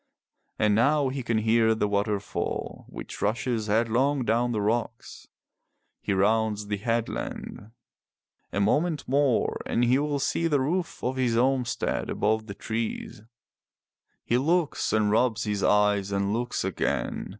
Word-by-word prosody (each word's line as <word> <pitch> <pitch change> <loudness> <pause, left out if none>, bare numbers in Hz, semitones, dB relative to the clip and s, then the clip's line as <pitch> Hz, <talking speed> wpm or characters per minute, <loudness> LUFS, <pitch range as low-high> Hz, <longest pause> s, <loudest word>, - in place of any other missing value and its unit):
And 105 -1 +3
now 140 +5 +3
he 135 +1 -4
can 115 -2 -1
hear 110 +1 +3
the 105 - 0
water 100 0 0
fall 100 - -5
which - - -8
rushes 115 +1 -1
headlong 120 +5 +1
down 120 +2 +1
the 110 - -1
rocks. 115 +2 -3 0.7
He - - -2
rounds 105 +2 +1
the 105 0 -2
headland. 115 -1 -3 0.8
A - - -2
moment 150 - +1
more 135 -2 +1
and 120 - +1
he 125 +3 +3
will 145 0 -1
see 165 +4 0
the 145 -3 +2
roof 170 +6 -2
of 130 +1 -1
his 125 -3 +1
home 130 +1 +2
stead 120 - -2
above 110 +1 0
the 100 - -7
trees. 110 -1 -4 1.0
He 120 - +2
looks 165 +3 +1
and 105 -1 +2
rubs 115 0 +2
his 105 -2 -2
eyes 105 -1 +2
and 100 +1 0
looks 120 +2 -2
again. - - -2
115 Hz, 150 wpm, -26 LUFS, 105-130 Hz, 1.0 s, And